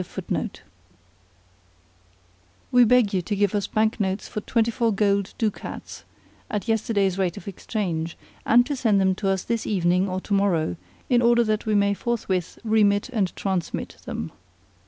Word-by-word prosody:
We 245 -1 +6
beg 235 -3 +4
you 185 - +1
to 205 +4 -3
give 205 0 +1
us 205 -2 0
bank 220 +2 +1
notes 190 -1 -1
for 210 - -5
twenty 230 +2 +1
four 230 0 +1
gold 200 -1 +1
ducats 215 -3 -4 0.4
at 210 -2 -3
yesterday's 205 -4 +1
rate 180 -3 0
of - - -10
exchange, 175 -4 -3 0.3
and 245 +2 +5
to 285 - -2
send 225 -6 +2
them 190 -1 +3
to 195 +1 -2
us 190 -1 0
this 230 -1 -2
evening 180 -1 +2
or 185 0 -2
to 205 - -4
morrow, 180 - +1 0.3
in 245 -1 +3
order 235 0 +4
that 215 -1 -1
we 215 - +2
may 200 0 +3
forthwith 200 -5 -2
remit 210 -1 +2
and 210 -7 -1
transmit 190 -3 -3
them. 80 +1 -5
205 Hz, 155 wpm, -24 LUFS, 190-225 Hz, 0.4 s, We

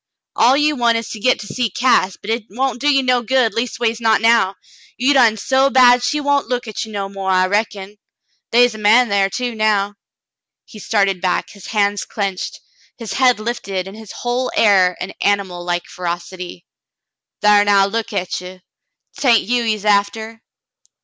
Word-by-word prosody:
All 255 +3 +4
you 300 +1 +1
want 235 -3 +2
is 230 - -5
to 220 - -7
git 255 +4 +2
to - - -8
see 235 +3 -2
Cass, 200 -4 +1
but 210 - -6
hit 225 -1 -2
won't 250 +4 -3
do 290 - +2
you 275 -1 +2
no 250 -1 +2
good, 245 0 +1
leastways 235 -1 -2
not 225 -1 +3
now. 225 -4 +3 0.4
You 260 +4 +2
done 235 -5 +4
so 265 +5 +2
bad 250 -2 +5
she 270 +5 -1
won't 285 -2 0
look 245 0 -3
at 215 - -4
ye 220 - -9
no 200 -2 -4
more, 195 -1 -5
I 185 0 +3
reckon. 205 0 -3 0.5
They 240 +1 +5
is 245 -2 +2
a 215 - -9
man 225 +4 +4
thar, 200 -1 +1
too, 245 +2 -3
now." 210 -2 0 0.7
He 215 - -13
started 195 -4 0
back, 185 -1 -1
his 200 -2 -13
hands 205 -2 0
clinched, 195 -3 -5 0.4
his 230 -3 -6
head 255 -3 +3
lifted, 200 -5 -4
in 195 - -9
his 220 -2 -11
whole 245 +1 -3
air 185 -4 +3
an 185 - -6
animal 195 -3 -1
like 175 0 -2
ferocity. 175 0 -7 0.8
"Thar 210 -1 +5
now, 200 -1 +4
look 225 +3 -3
at 185 -3 -3
ye. 185 0 -11 0.6
'Tain't 245 -5 +3
you 245 +3 0
he's 215 -3 -2
after." 220 +2 0
220 Hz, 185 wpm, -18 LUFS, 195-245 Hz, 0.8 s, bad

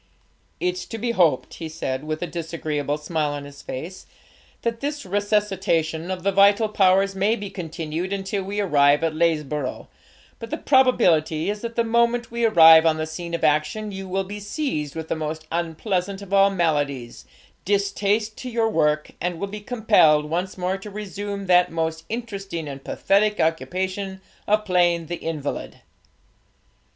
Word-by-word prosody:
'It's 180 +1 -1
to 225 - -6
be 235 +2 -1
hoped,' 170 - +2
he 160 - -4
said, 135 -4 -4
with 155 +2 -3
a - - 0
disagreeable 155 -4 -3
smile 150 -1 -2
on 145 -1 -6
his 145 0 -12
face, 165 +8 -7 0.6
'that 230 -1 -1
this 290 0 -4
resuscitation 190 -5 0
of 185 -2 -4
the 200 - +2
vital 200 +3 +5
powers 195 -1 +3
may 200 +4 +1
be 205 -3 -7
continued 165 +1 -4
until 195 0 -2
we 200 +2 -4
arrive 145 -6 +4
at 165 -1 +1
Lesborough', 150 -4 -1 0.5
but 230 - -7
the - - -2
probability 180 - +3
is 210 0 -6
that 235 -1 -5
the 235 - +2
moment 235 +1 +1
we 235 0 -2
arrive 165 -6 +8
on 160 -1 +3
the 155 - -2
scene 170 +2 -5
of 170 - -5
action, 155 +8 +1
you 195 0 -6
will 195 +1 0
be 205 +2 -7
seized 205 - -3
with 160 -1 -5
that - - -1
most 155 0 -4
unpleasant 180 +3 -2
of 200 0 -9
all 195 0 +6
maladies, 145 -9 -1 0.4
distaste 205 +2 0
to 255 - -7
your 230 -2 +1
work, 150 -5 +1
and 175 -1 -2
will 200 - -1
be 210 +2 -7
compelled 205 -10 +4
once 180 +5 -3
more 185 +1 -1
to 210 - -9
resume 205 -1 -5
that 180 -1 +4
most 160 0 -2
interesting 195 -8 -5
and 135 -1 -8
pathetic 210 +2 +1
occupation 190 +4 -1 0.3
of 215 +1 +2
playing 175 -3 +2
the 175 +2 -4
invalid!' 155 -4 -5
180 Hz, 165 wpm, -23 LUFS, 160-205 Hz, 0.6 s, arrive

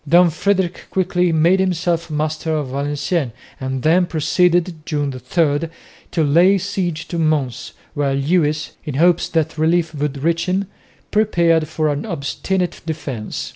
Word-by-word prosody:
Don 175 +1 +6
Frederick 190 +1 -1
quickly 180 -2 +1
made 165 +4 +3
himself 175 -2 0
master 155 +1 -1
of 145 -4 -2
Valenciennes 145 0 -1 0.3
and 130 -1 -3
then 175 +3 +4
proceeded 175 +1 +1
(June 145 -3 -2
3) 145 +5 0 0.4
to 165 - 0
lay 170 +7 +5
siege 180 -4 -3
to 170 - -3
Mons, 150 -6 -1 0.2
where 140 -2 0
Lewis, 150 +1 +1
in 150 -4 -5
hopes 175 +3 +3
that 160 -1 -1
relief 165 +1 +2
would 145 -2 -3
reach 170 +2 +1
him, 190 +2 0 0.5
prepared 170 -7 +2
for 155 0 -1
an 145 +8 -2
obstinate 180 +2 -2
defence. 145 -9 -5
160 Hz, 140 wpm, -19 LUFS, 145-175 Hz, 0.5 s, Don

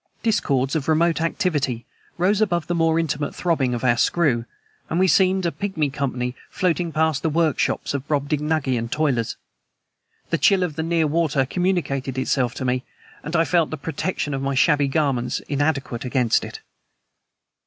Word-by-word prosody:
Discords 140 - +1
of 150 -4 -1
remote 160 +1 +2
activity 145 -8 -1 0.3
rose 195 +4 +2
above 175 -7 +1
the 175 - -2
more 165 -1 +2
intimate 150 -3 -1
throbbing 140 -8 0
of 120 - -5
our 120 -2 +3
screw, 130 -6 +2 0.4
and 165 - 0
we 190 - +4
seemed 190 0 +3
a 170 - +1
pigmy 165 -9 -2
company 125 -3 -2
floating 175 -2 0
past 160 -2 +1
the 160 - 0
workshops 155 -3 0
of 140 0 -4
Brobdingnagian 145 -4 0
toilers. 130 -6 0 1.0
The - - +1
chill 195 -2 +4
of 165 -5 -3
the 160 - -2
near 165 0 +1
water 150 -3 +1
communicated 140 -6 -1
itself 130 -2 0
to 130 - -4
me, 125 0 0 0.4
and 160 +3 -4
I 165 0 +4
felt 170 -3 +2
the 155 - -4
protection 150 +1 -3
of 135 - -2
my 135 0 -1
shabby 145 0 +3
garments 135 -4 0
inadequate 140 -4 -1
against 125 -2 +1
it. - - -8
150 Hz, 165 wpm, -22 LUFS, 135-170 Hz, 1.0 s, we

